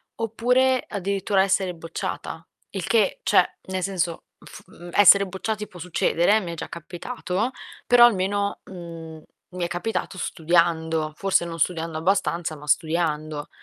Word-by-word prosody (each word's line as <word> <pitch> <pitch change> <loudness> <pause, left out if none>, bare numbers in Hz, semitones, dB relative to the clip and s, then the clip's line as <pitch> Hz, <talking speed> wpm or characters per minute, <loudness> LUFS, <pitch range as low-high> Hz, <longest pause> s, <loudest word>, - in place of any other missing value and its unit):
oppure 250 +3 +2
addirittura 195 0 0
essere 190 -2 +1
bocciata. 165 0 -6 0.3
Il 190 -4 -4
che 230 - +2
cioè, - - +3
nel 190 0 -2
senso: 175 -3 -2 0.2
fu - - -12
mhmm, 175 0 -11
essere 200 0 +7
bocciati 210 +3 -4
può 180 - -13
succedere, 175 +2 +2
eh, - - +4
mi 175 -3 -5
è - - -5
già - - -6
capitato, 185 +6 -4 0.3
però 240 -1 +7
almeno, 200 -1 +1
mhmm, 165 -3 -9 0.3
mi 180 -1 -4
è 170 - 0
capitato 185 +2 -3
studiando, 160 -2 +1
forse 195 -1 +1
non 165 -1 -6
studiando 165 -1 -1
abbastanza, 170 -2 0
ma 150 +1 -12
studiando. 155 -2 0
180 Hz, 145 wpm, -24 LUFS, 165-200 Hz, 0.3 s, essere